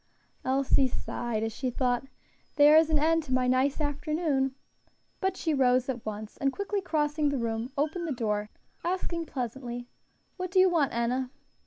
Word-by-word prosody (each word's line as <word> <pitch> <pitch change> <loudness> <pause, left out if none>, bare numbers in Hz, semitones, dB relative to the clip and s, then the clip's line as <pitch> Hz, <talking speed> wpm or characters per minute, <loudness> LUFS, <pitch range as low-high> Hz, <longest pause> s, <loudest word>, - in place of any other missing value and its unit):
Elsie 265 0 +3
sighed, 235 -3 -3
as 225 0 -2
she 260 +2 -2
thought, 245 +1 0 0.5
"There 295 +1 +7
is 320 0 +6
an 310 - +3
end 325 +2 +3
to 260 - -3
my 255 0 +2
nice 260 +3 +2
afternoon," 290 -2 0 0.6
but 380 -1 -1
she 320 - 0
rose 255 -2 +3
at 245 -3 -3
once, 215 0 -6
and 275 -1 +1
quickly 405 +4 -2
crossing 300 -3 0
the 280 - -1
room, 230 +1 -2
opened 315 +4 -1
the - - -2
door, 210 -4 -1 0.3
asking 340 -2 -2
pleasantly, 245 -1 -4 0.5
"What 365 -1 -3
do 375 - -2
you 370 0 +6
want, 305 -6 +2
Enna?" 245 +2 -1
270 Hz, 170 wpm, -28 LUFS, 245-315 Hz, 0.6 s, There